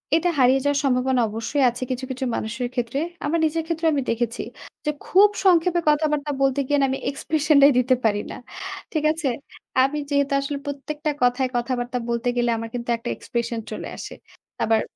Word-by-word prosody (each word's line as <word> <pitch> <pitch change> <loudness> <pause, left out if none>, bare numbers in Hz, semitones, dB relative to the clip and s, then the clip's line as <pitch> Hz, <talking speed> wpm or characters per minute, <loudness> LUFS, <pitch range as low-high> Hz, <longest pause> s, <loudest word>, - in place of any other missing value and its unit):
এটা 335 +2 +2
হারিয়ে 255 +1 +5
যাওয়ার 285 0 +2
সম্ভাবনা 255 -1 +2
অবশ্যই 230 +6 -1
আছে 245 +2 -5
কিছু, 255 +1 -3
কিছু 260 0 -3
মানুষের 230 +3 -3
ক্ষেত্রে। 250 +2 -2 0.3
আমার 325 +3 +1
নিজের 320 +1 0
ক্ষেত্রেও 325 0 0
আমি 285 - +1
দেখেছি, 230 0 -2 0.4
যে 300 - +2
খুব 400 +3 +6 0.2
সংক্ষেপে 350 -1 +4
কথাবার্তা 300 -1 +1
বলতে 270 0 +2
গিয়ে 290 - +2
না - - +4
আমি 265 - -2
এক্সপ্রেশন 305 +2 +1
টাই 280 +1 +8
দিতে 255 +1 +3
পারি 205 -2 +3
না। - - -6 0.6
ঠিক 310 -2 0
আছে? 320 -2 -2 0.6
আমি 275 +3 0
যেহেতু 280 -1 +1
আসলে 280 +1 -3
প্রত্যেকটা 295 +2 -3
কথায় 250 +1 +3
কথাবার্তা 245 0 -1
বলতে 235 +1 -1
গেলে 240 0 +2
আমার 225 0 -5
কিন্তু 240 0 -5
একটা 230 +1 -6
এক্সপ্রেশন 235 -1 -3
চলে - - -5
আসে। - - -7 0.5
আবার 225 0 +3
270 Hz, 180 wpm, -23 LUFS, 245-300 Hz, 0.6 s, টাই